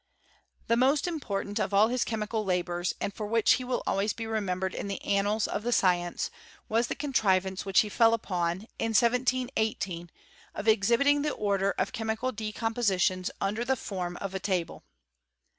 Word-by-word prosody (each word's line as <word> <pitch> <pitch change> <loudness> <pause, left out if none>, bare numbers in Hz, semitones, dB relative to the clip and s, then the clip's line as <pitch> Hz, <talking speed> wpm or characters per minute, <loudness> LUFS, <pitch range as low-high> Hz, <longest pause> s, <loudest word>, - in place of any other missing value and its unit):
The 230 - +2
most 265 +4 +3
important 210 - -3
of 200 -1 -1
all 215 +3 +5
his 250 0 +1
chemical 220 0 -2
labours, 175 -2 -1
and 200 - -3
for 210 +1 -5
which 225 +1 +3
he 255 - -1
will 250 0 -2
always 200 +2 0
be 225 - -5
remembered 190 -4 -2
in - - -4
the 200 - -3
annals 205 +2 +1
of - - -3
the 240 +2 -2
science, 175 -5 +1 0.4
was 230 +2 +1
the - - -3
contrivance 190 -9 0
which 190 -3 +5
he 215 - -3
fell 230 +2 +4
upon, 180 -4 -2 0.2
in 225 0 -1
1718, 235 -7 +1 0.5
of 210 - -5
exhibiting 235 +7 +4
the 300 - 0
order 200 -3 0
of 185 - -1
chemical 225 +3 -2
decom 220 +1 -3
poaitione 185 -5 +1
under 210 +4 -1
the 265 +2 +1
form 180 -6 -4
of 195 -1 -5
a 190 - -2
table. 185 -3 -2
210 Hz, 175 wpm, -28 LUFS, 190-230 Hz, 0.5 s, all